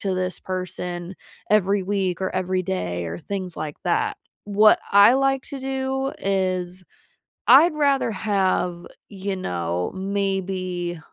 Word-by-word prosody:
to 195 -2 -1
this 185 0 -2
person 180 -1 -5 0.4
every 200 -1 +3
week 190 -2 -1
or 190 - 0
every 185 0 0
day 90 - -3
or 85 +1 -5
things 185 -3 -5
like 150 -2 -5
that," 175 -1 +1 0.3
what 210 +1 +5
I 200 +4 +8
like 270 0 +2
to 280 - -7
do 265 0 -2
is, 185 -2 -1 0.6
I'd 335 -1 +7
rather 280 -5 +2
have, 185 -3 0 0.2
you 195 -1 -4
know, 90 - -2
maybe 190 -3 -2
190 Hz, 130 wpm, -23 LUFS, 180-205 Hz, 0.6 s, I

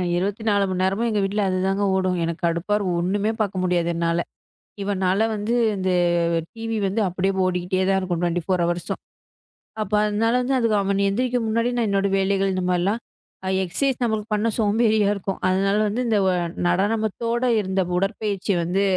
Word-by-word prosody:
24 200 +2 0
மணி 185 0 -1
நேரமும் 195 +5 +1
எங்க 215 -2 0
வீட்ல 205 +2 -1
அதுதாங்க 190 +2 0
ஓடும். 185 -1 0
எனக்கு 165 0 -3
கடுப்பா 170 +5 -1
இருக்கும். 190 -4 -1
ஓண்ணுமே 200 +5 0
பார்க்க 195 -3 -1
முடியாது 175 -2 +1
என்னால. 170 0 0 0.6
இவனால 195 +1 +1
வந்து 210 +3 -2 0.2
இந்த 190 -1 -1 0.6
டிவி 225 0 -4
வந்து 205 +4 -1
அப்டியே 185 +2 -1
ஓடிகிட்டே 185 +1 -1
தான் 195 0 +3
இருக்கும். 180 -3 -2
24 175 0 -1 0.8
அப்ப 210 0 -10
அதனால 220 +2 +1
வந்து 250 -3 +1
அவன் 200 0 0
எந்திரிக்க 245 +5 0
முன்னாடி 230 +2 +1
நான் 230 -3 +1
என்னோட 200 0 +1
வேலைகள் 195 0 +1
இந்தமாரிலாம் 185 +4 0 0.5
ஆ - - -2 0.2
எக்ஸர்சைஸ் 260 +8 -1
நம்மளுக்கு 220 -1 -2
பண்ண 210 +2 0
சோம்பேறியா 215 -1 +3
இருக்கும். 195 -1 -4
அதனால 195 +2 +2
வந்து 220 +5 -1
இந்த 220 -2 +2 0.5
நடனத்தோட 220 +5 0 0.2
இருந்த 190 -1 0 0.2
உடற்பயிற்சி 200 0 -1
வந்து 185 +4 0
195 Hz, 150 wpm, -23 LUFS, 185-215 Hz, 0.8 s, தான்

